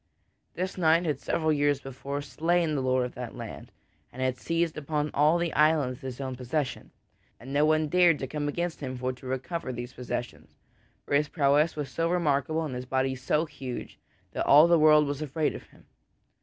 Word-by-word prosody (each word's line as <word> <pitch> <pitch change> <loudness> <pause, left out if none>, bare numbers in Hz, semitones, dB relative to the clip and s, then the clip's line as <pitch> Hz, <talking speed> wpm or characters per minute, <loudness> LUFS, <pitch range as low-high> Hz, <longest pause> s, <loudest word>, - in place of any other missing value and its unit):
This 185 +1 -3
knight 165 +1 +4
had 150 -4 -1
several 155 +1 0
years 145 -1 +2
before 140 +2 -6
slain 165 +2 0
the 140 - 0
lord 130 -1 +1
of 125 - -7
that 125 -1 -7
land, - - -8 0.4
and 125 - -12
had 130 -1 0
seized 165 +6 -1
upon 150 0 -2
all 150 +3 +4
of 170 - 0
the 170 -1 -1
island 150 -3 +3
as - - -22
his 130 -2 -7
own 130 -2 -4
possession, 125 +2 -3 0.5
and 130 +3 -9
no 145 +1 +4
one 155 0 +2
dared 175 -1 +4
to 135 - -4
come 145 +2 -3
against 170 +3 -3
him 130 -3 -5
for 130 +1 -2
to 130 +1 -12
recover 130 +3 -3
these 120 +1 -6
possessions, 125 -1 -6 0.5
for - - -4
his 150 +1 +3
prowess 150 +1 +2
was 150 -3 -4
so 165 0 -1
remarkable 160 -2 +1
and 145 - -5
his 125 0 -6
body 130 0 0
so 130 +5 0
huge 130 -5 -7 0.3
that - - -3
all 150 +4 +8
the 170 -1 +4
world 150 -1 +6
was 145 +1 -3
afraid 155 +1 -1
of - - -10
him. - - -22
145 Hz, 205 wpm, -28 LUFS, 130-160 Hz, 0.5 s, all